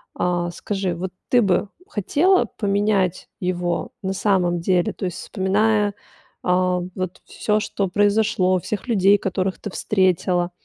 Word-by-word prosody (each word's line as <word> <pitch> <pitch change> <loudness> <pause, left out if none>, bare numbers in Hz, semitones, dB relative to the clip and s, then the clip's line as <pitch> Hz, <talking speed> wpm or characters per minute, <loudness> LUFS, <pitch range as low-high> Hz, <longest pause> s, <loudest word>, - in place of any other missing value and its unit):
а, 175 -1 0
скажи, 190 -1 -3
вот 180 +2 -4 0.2
ты 245 -1 +5
бы 195 +1 +1 0.2
хотела 340 - +2
поменять 200 -3 0
его, 180 -2 -2
на 190 0 -1
самом 180 -4 +1
деле? 180 -1 +1
То 190 - -5
есть, 180 - -4
вспоминая, 205 +2 +1 0.5
а, 180 0 +2
вот 185 -1 -4
всё, 210 0 0
что 200 -2 -2
произошло, 205 -2 +2
всех 210 +6 -5
людей, 205 -3 +4
которых 190 0 -2
ты 205 - -5
встретила, 180 -3 +1
190 Hz, 135 wpm, -22 LUFS, 180-205 Hz, 0.5 s, ты